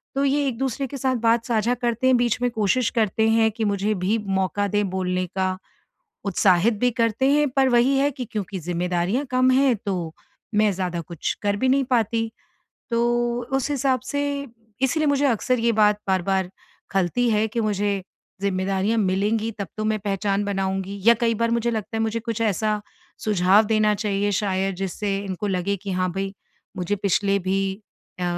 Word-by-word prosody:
तो 275 Hz, -, +1 dB
ये 285 Hz, +1 st, +2 dB
एक-दूसरे 265 Hz, +1 st, -2 dB
के 275 Hz, -, -7 dB
साथ 260 Hz, 0 st, 0 dB
बात 230 Hz, 0 st, +2 dB
साझा 230 Hz, 0 st, +1 dB
करते 240 Hz, +1 st, 0 dB
हैं 260 Hz, -, +5 dB
बीच 240 Hz, 0 st, 0 dB
में 245 Hz, -, +2 dB
कोशिश 225 Hz, +2 st, +1 dB
करते 220 Hz, +1 st, +2 dB
हैं 225 Hz, 0 st, +4 dB
कि 220 Hz, +1 st, -3 dB
मुझे 205 Hz, +1 st, 0 dB
भी 205 Hz, +5 st, +2 dB, 0.2 s
मौका 195 Hz, +2 st, 0 dB
दें 205 Hz, 0 st, 0 dB
बोलने 185 Hz, -1 st, -1 dB
का 185 Hz, -1 st, 0 dB, 0.7 s
उत्साहित 195 Hz, +2 st, +3 dB
भी 250 Hz, -, +3 dB
करते 230 Hz, +3 st, +1 dB
हैं 295 Hz, 0 st, +3 dB
पर 265 Hz, +1 st, +3 dB
वही 250 Hz, +2 st, +3 dB
है 280 Hz, +1 st, +2 dB
कि 260 Hz, -2 st, -6 dB
क्योंकि 200 Hz, -2 st, -3 dB
ज़िम्मेदारियाँ 180 Hz, -, -1 dB
कम 255 Hz, 0 st, +3 dB
हैं 265 Hz, 0 st, +4 dB
तो 175 Hz, -5 st, -2 dB, 0.4 s
मैं 210 Hz, 0 st, +4 dB
ज़्यादा 180 Hz, -2 st, -3 dB
कुछ 165 Hz, 0 st, -3 dB
कर 205 Hz, -1 st, +1 dB
भी 260 Hz, +5 st, 0 dB
नहीं 270 Hz, +1 st, +3 dB
पाती। 225 Hz, -1 st, +1 dB, 0.6 s
तो 230 Hz, -1 st, +1 dB, 0.6 s
उस 270 Hz, +2 st, -2 dB
हिसाब 270 Hz, -2 st, +1 dB
से 285 Hz, -1 st, 0 dB, 0.6 s
इसीलिए 300 Hz, +4 st, +2 dB
मुझे 285 Hz, 0 st, +2 dB
अक्सर 250 Hz, 0 st, +1 dB
ये 230 Hz, +1 st, +2 dB
बात 210 Hz, -1 st, +3 dB
बार-बार 190 Hz, 0 st, +1 dB, 0.4 s
खलती 195 Hz, +6 st, +1 dB
है 215 Hz, 0 st, +2 dB
कि 230 Hz, +2 st, -3 dB
मुझे 205 Hz, -2 st, 0 dB, 0.4 s
ज़िम्मेदारियाँ 195 Hz, +2 st, 0 dB
मिलेंगी 210 Hz, +3 st, 0 dB
तब 200 Hz, -, -3 dB
तो 215 Hz, -, -2 dB
मैं 215 Hz, 0 st, 0 dB
पहचान 200 Hz, 0 st, -1 dB
बनाऊँगी 195 Hz, 0 st, -2 dB
या 235 Hz, -, +9 dB
कई 230 Hz, -1 st, +3 dB
बार 230 Hz, +1 st, 0 dB
मुझे 235 Hz, 0 st, +1 dB
लगता 220 Hz, 0 st, -4 dB
है -, -, 0 dB
मुझे 225 Hz, +1 st, -1 dB
कुछ 230 Hz, -1 st, -4 dB
ऐसा 215 Hz, 0 st, 0 dB, 0.4 s
सुझाव 200 Hz, 0 st, +4 dB
देना 215 Hz, -1 st, +2 dB
चाहिए 205 Hz, -1 st, -1 dB
शायद 195 Hz, -1 st, -1 dB
जिससे 195 Hz, +2 st, -2 dB
इनको 200 Hz, 0 st, -4 dB
लगे 195 Hz, +1 st, 0 dB
कि 195 Hz, +1 st, -6 dB
हाँ, 185 Hz, 0 st, 0 dB
भई 195 Hz, +2 st, -3 dB, 0.4 s
मुझे 185 Hz, +3 st, -1 dB
पिछले 200 Hz, 0 st, +1 dB
भी 195 Hz, +1 st, 0 dB, 0.5 s
अ, -, -, -2 dB
210 Hz, 180 wpm, -23 LUFS, 195-235 Hz, 0.7 s, या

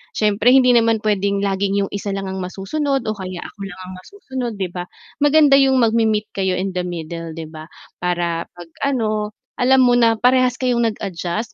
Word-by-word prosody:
Siyempre 215 Hz, +4 st, +3 dB
hindi 255 Hz, -2 st, +5 dB
naman 230 Hz, -2 st, +3 dB
pwedeng 200 Hz, -1 st, 0 dB
laging 200 Hz, 0 st, 0 dB
'yong 195 Hz, -, -5 dB
isa 200 Hz, -1 st, -4 dB
lang 195 Hz, -1 st, -4 dB
ang 190 Hz, -, -5 dB
masusunod 265 Hz, +9 st, -2 dB
o 215 Hz, -, -2 dB
kaya 185 Hz, -4 st, -6 dB
ako -, -, -12 dB
lang 185 Hz, -, -11 dB
ang 185 Hz, 0 st, -9 dB
masusunod, 260 Hz, -, -6 dB
'di 190 Hz, -3 st, -4 dB
ba? 180 Hz, 0 st, -6 dB, 0.3 s
Maganda 290 Hz, -1 st, +5 dB
'yong 270 Hz, -1 st, +4 dB
magme-meet 220 Hz, -2 st, +1 dB
kayo 190 Hz, -2 st, -1 dB
in 190 Hz, +1 st, -2 dB
the 180 Hz, -1 st, -3 dB
middle, 165 Hz, -1 st, -6 dB
'di 165 Hz, -, -6 dB
ba, 155 Hz, 0 st, -10 dB, 0.3 s
para 175 Hz, -1 st, -1 dB
'pag 175 Hz, -1 st, -11 dB, 0.2 s
ano, 215 Hz, -5 st, -1 dB, 0.2 s
alam 260 Hz, 0 st, +4 dB
mo 245 Hz, -, +4 dB
na, 230 Hz, -2 st, +4 dB
parehas 255 Hz, +1 st, +3 dB
kayong 250 Hz, -2 st, 0 dB
nag-adjust, 210 Hz, -1 st, -3 dB
210 Hz, 185 wpm, -19 LUFS, 185-245 Hz, 0.3 s, hindi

